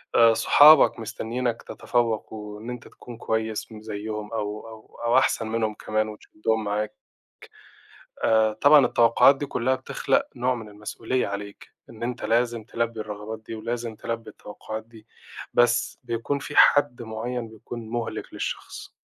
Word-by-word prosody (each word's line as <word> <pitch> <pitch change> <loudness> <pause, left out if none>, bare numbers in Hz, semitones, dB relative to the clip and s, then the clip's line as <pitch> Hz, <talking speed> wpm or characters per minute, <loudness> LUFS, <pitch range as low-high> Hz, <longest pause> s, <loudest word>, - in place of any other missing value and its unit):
آآ، 115 -1 +7
صحابك 150 +4 +7
مستنينك 115 +2 -3
تتفوّق 115 -3 -1
وإن 105 +1 -8
أنت 125 -2 -7
تكون 120 -2 -12
كويّس 110 0 -2
م 110 -1 -10
زيهم 105 0 -6
أو 105 0 -4
أو 110 -1 -14
أو 120 +2 +4
أحسن 130 -4 +2
منهم 110 -1 -1
كمان 110 +1 -1
وتشدّهم 110 +1 -3
معاك. 105 +1 -2 1.3
آآ، 110 -1 +4
طبعًا 145 +5 +6
التوقعات 120 +4 +5
دي 145 - -4
كُلها 130 -1 0
بتخلق - - 0
نوع 125 +1 +1
من 110 -3 -8
المسؤولية 110 +4 -3
عليك، 100 0 -7 0.2
إن 115 -1 -12
أنت 120 0 -3
لازم 115 0 +1
تلبّي 115 0 -3
الرغبات 105 +1 -6
دي - - -6
ولازم 115 +1 -4
تلبّي 115 +1 -5
التوقعات 110 +1 -8
دي، 110 -1 -17 0.5
بس 120 0 +2
بيكون 120 +3 -2
في 145 +1 -7
حد 145 -4 +5
معيّن 115 +1 -4
بيكون 110 +1 -9
مُهلِك 120 -1 -4
للشخص. - - -5
115 Hz, 145 wpm, -25 LUFS, 110-120 Hz, 1.3 s, آآ